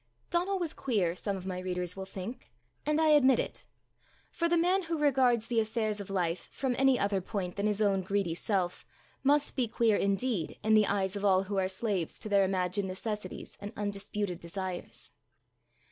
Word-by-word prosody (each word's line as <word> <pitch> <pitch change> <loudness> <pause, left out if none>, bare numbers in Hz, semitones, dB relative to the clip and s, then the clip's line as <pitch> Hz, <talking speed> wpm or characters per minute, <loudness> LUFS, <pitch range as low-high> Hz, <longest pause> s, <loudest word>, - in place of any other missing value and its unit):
Donal 365 +3 +1
was 345 -4 -2
queer, 200 -10 0
some 195 +2 -2
of 185 - -8
my 185 -1 -3
readers 180 -1 -2
will 190 -1 -6
think, 195 +6 -7 0.4
and 300 +1 +2
I 320 -1 +4
admit 270 -4 +6
it; - - -4 0.6
for 335 -1 0
the 345 - +3
man 360 +3 +3
who 335 -2 -2
regards 260 -6 +3
the 230 -1 +1
affairs 220 -1 -1
of 200 - -9
life 180 -3 -1
from 265 -2 -1
any 270 -1 +5
other 200 -2 +1
point 185 -2 -4
than 200 +1 0
his 210 0 +1
own 195 -2 +2
greedy 190 -2 0
self, 180 0 -1 0.4
must 290 +1 +2
be 255 -3 +1
queer 220 -1 +2
indeed 200 -2 0
in 220 - +3
the 215 -1 +6
eyes 195 -1 0
of 200 - -4
all 190 -2 +4
who 195 +1 -3
are 190 -1 +2
slaves 190 -3 -2
to 215 - -6
their 200 -1 +5
imagined 190 +1 0
necessities 200 +1 -5
and 205 +1 -6
undisputed 205 -2 -3
desires. 180 +1 -5
205 Hz, 190 wpm, -31 LUFS, 190-245 Hz, 0.6 s, admit